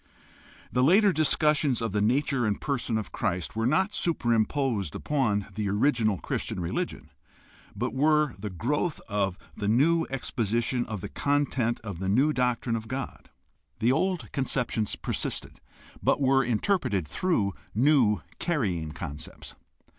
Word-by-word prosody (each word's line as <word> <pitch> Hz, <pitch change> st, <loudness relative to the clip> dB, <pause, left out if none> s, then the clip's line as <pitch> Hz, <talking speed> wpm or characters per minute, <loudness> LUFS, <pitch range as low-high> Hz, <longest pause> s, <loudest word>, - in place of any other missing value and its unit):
The 125 Hz, -, +1 dB
later 195 Hz, +7 st, +5 dB
discussions 150 Hz, -3 st, +2 dB
of 115 Hz, -2 st, -2 dB
the 105 Hz, +1 st, 0 dB
nature 130 Hz, +3 st, +1 dB
and 105 Hz, -, -1 dB
person 130 Hz, -5 st, -1 dB
of 110 Hz, -, -5 dB
Christ 90 Hz, +3 st, -2 dB
were 115 Hz, +1 st, +1 dB
not 190 Hz, +9 st, +2 dB
superimposed 120 Hz, -, 0 dB
upon 115 Hz, -9 st, 0 dB
the 105 Hz, -1 st, -2 dB
original 110 Hz, -1 st, +2 dB
Christian -, -, -3 dB
religion, 85 Hz, -1 st, -3 dB, 0.6 s
but -, -, -2 dB
were 150 Hz, 0 st, +3 dB
the 105 Hz, +1 st, -4 dB
growth 145 Hz, -, -1 dB
of 100 Hz, -3 st, -1 dB, 0.2 s
the 100 Hz, -, -3 dB
new 160 Hz, +9 st, +3 dB
exposition 120 Hz, -1 st, -1 dB
of 110 Hz, -4 st, -5 dB
the -, -, -4 dB
content 135 Hz, -5 st, 0 dB
of 100 Hz, -6 st, -6 dB
the 95 Hz, 0 st, -2 dB
new 135 Hz, +9 st, +3 dB
doctrine 125 Hz, -2 st, 0 dB
of 110 Hz, 0 st, -5 dB
God. 130 Hz, +3 st, -6 dB, 0.5 s
The 115 Hz, +2 st, +2 dB
old 185 Hz, +5 st, 0 dB
conceptions 125 Hz, -5 st, -1 dB
persisted, -, -, -4 dB, 0.4 s
but -, -, +2 dB
were 135 Hz, -1 st, +4 dB
interpreted 120 Hz, -, 0 dB
through 100 Hz, -, 0 dB, 0.2 s
new 125 Hz, -4 st, +4 dB, 0.2 s
carrying 95 Hz, -, -1 dB
concepts. 75 Hz, -2 st, -7 dB
120 Hz, 140 wpm, -27 LUFS, 105-145 Hz, 0.6 s, later